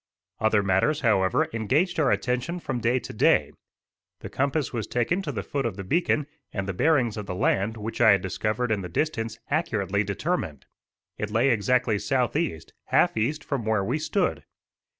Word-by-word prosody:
Other 110 Hz, -2 st, +3 dB
matters, 100 Hz, +11 st, +2 dB
however, 100 Hz, -6 st, +2 dB
engaged 145 Hz, -, +1 dB
our 145 Hz, -4 st, +3 dB
attention 125 Hz, +10 st, -1 dB
from 125 Hz, -, -3 dB
day 120 Hz, +2 st, +2 dB
to 125 Hz, -, -6 dB
day. -, -, +3 dB, 0.7 s
The -, -, -8 dB
compass 140 Hz, +1 st, -1 dB
was 110 Hz, -3 st, -3 dB
taken 125 Hz, +10 st, 0 dB
to 155 Hz, -, -4 dB
the 105 Hz, -7 st, -4 dB
foot 140 Hz, -1 st, -2 dB
of 110 Hz, -6 st, -3 dB
the 95 Hz, -, -5 dB
beacon, 150 Hz, -, +1 dB, 0.3 s
and 100 Hz, -1 st, -3 dB
the 95 Hz, -, -2 dB
bearings 120 Hz, -, +2 dB
of 105 Hz, -2 st, -5 dB
the 90 Hz, -, -4 dB
land 100 Hz, +4 st, +1 dB
which 110 Hz, +3 st, -5 dB
I 110 Hz, -3 st, +8 dB
had 100 Hz, -, +1 dB
discovered 110 Hz, +5 st, -1 dB
in 105 Hz, -2 st, 0 dB
the 90 Hz, -, -6 dB
distance 115 Hz, -, -2 dB
accurately 105 Hz, -, 0 dB
determined. 100 Hz, -, -3 dB, 0.5 s
It 105 Hz, -, -2 dB
lay 115 Hz, +5 st, +3 dB
exactly 120 Hz, 0 st, +2 dB
southeast, 135 Hz, -, -1 dB
half -, -, +3 dB
east, 145 Hz, +8 st, -1 dB
from 140 Hz, -5 st, -3 dB
where 110 Hz, -2 st, +1 dB
we 125 Hz, +10 st, -1 dB
stood. 155 Hz, -, -1 dB
115 Hz, 180 wpm, -26 LUFS, 100-140 Hz, 0.7 s, I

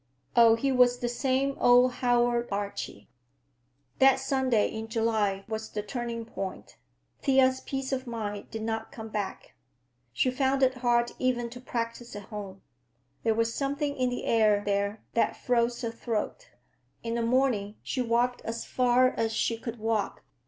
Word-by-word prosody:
Oh, 230 Hz, -1 st, +7 dB
he 270 Hz, +4 st, 0 dB
was 250 Hz, -1 st, +4 dB
the 245 Hz, -1 st, -2 dB
same 265 Hz, +3 st, 0 dB
old 245 Hz, -3 st, +6 dB
Howard 240 Hz, -1 st, +2 dB
Archie! 200 Hz, -, -4 dB, 0.9 s
That 270 Hz, 0 st, +7 dB
Sunday 265 Hz, -5 st, +1 dB
in 220 Hz, 0 st, -5 dB
July 220 Hz, -4 st, 0 dB
was 220 Hz, 0 st, -4 dB
the 210 Hz, -, -4 dB
turning 235 Hz, 0 st, -4 dB
point; 195 Hz, -4 st, -6 dB, 0.5 s
Thea's 260 Hz, -1 st, +4 dB
peace 270 Hz, 0 st, -4 dB
of 260 Hz, -1 st, -2 dB
mind 210 Hz, -3 st, -5 dB
did 220 Hz, -1 st, -5 dB
not 225 Hz, 0 st, -3 dB
come 220 Hz, -1 st, -8 dB
back. 205 Hz, -3 st, -5 dB, 0.6 s
She 195 Hz, -, +1 dB
found 265 Hz, +1 st, +1 dB
it 260 Hz, 0 st, +3 dB
hard 240 Hz, -1 st, +2 dB
even 240 Hz, -2 st, 0 dB
to 245 Hz, 0 st, -9 dB
practice 235 Hz, -2 st, -4 dB
at 205 Hz, -, -6 dB
home. 200 Hz, -3 st, -7 dB, 0.6 s
There 225 Hz, -1 st, +1 dB
was 230 Hz, 0 st, +1 dB
something 285 Hz, +1 st, -1 dB
in 255 Hz, -2 st, +1 dB
the 245 Hz, -, -4 dB
air 215 Hz, -2 st, +3 dB
there 200 Hz, +1 st, -1 dB
that 230 Hz, -, +1 dB
froze 240 Hz, -1 st, +1 dB
her 230 Hz, -, -1 dB
throat. 230 Hz, -, -4 dB, 0.5 s
In 230 Hz, 0 st, -2 dB
the 235 Hz, -, 0 dB
morning, 230 Hz, -4 st, +1 dB
she 255 Hz, -, -2 dB
walked 245 Hz, +1 st, +1 dB
as 230 Hz, +1 st, -5 dB
far 250 Hz, 0 st, +3 dB
as 225 Hz, -3 st, -1 dB
she 230 Hz, +1 st, 0 dB
could 230 Hz, +1 st, -6 dB
walk. 220 Hz, -1 st, -1 dB
235 Hz, 160 wpm, -28 LUFS, 220-255 Hz, 0.9 s, Oh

